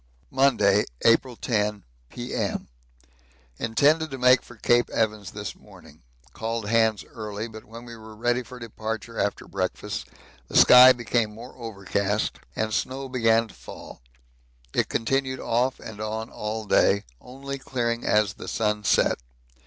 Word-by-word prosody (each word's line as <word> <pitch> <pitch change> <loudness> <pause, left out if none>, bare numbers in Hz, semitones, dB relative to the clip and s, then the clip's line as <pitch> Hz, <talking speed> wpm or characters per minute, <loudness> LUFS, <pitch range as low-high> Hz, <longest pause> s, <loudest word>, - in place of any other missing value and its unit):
Monday, 120 -7 +3 0.2
April 120 +2 +4
10, 105 -4 -1 0.3
P.M. 120 0 -3 0.9
Intended 150 +8 +2
to 135 - -6
make 125 0 +5
for 120 - -14
Cape 120 +2 +2
Evans 105 -4 -1
this 105 +1 -6
morning. - - -17 0.3
Called 115 -1 -3
hands 110 -2 +2
early, 110 -1 -5
but 110 -1 -11
when 115 +2 -11
we 120 -1 -9
were 110 -1 -12
ready 120 +3 0
for 125 +1 -11
departure 115 -1 -5
after 100 - -1
breakfast, 95 -2 -3 0.4
the - - -1
sky 125 +1 +10
became 120 -3 -1
more 120 +3 -10
overcast 105 -2 -2 0.2
and 110 0 -1
snow 135 +4 -2
began 115 -2 +3
to - - -15
fall. - - -11 0.7
It - - +1
continued 130 +2 -1
off 125 +3 0
and 105 -1 -9
on 110 +1 -4
all 110 +1 -4
day, 100 0 +3 0.2
only 140 +2 -7
clearing 120 -3 -2
as 105 -3 +2
the - - -10
sun 105 -1 -1
set. - - +3
115 Hz, 145 wpm, -25 LUFS, 105-125 Hz, 0.9 s, sky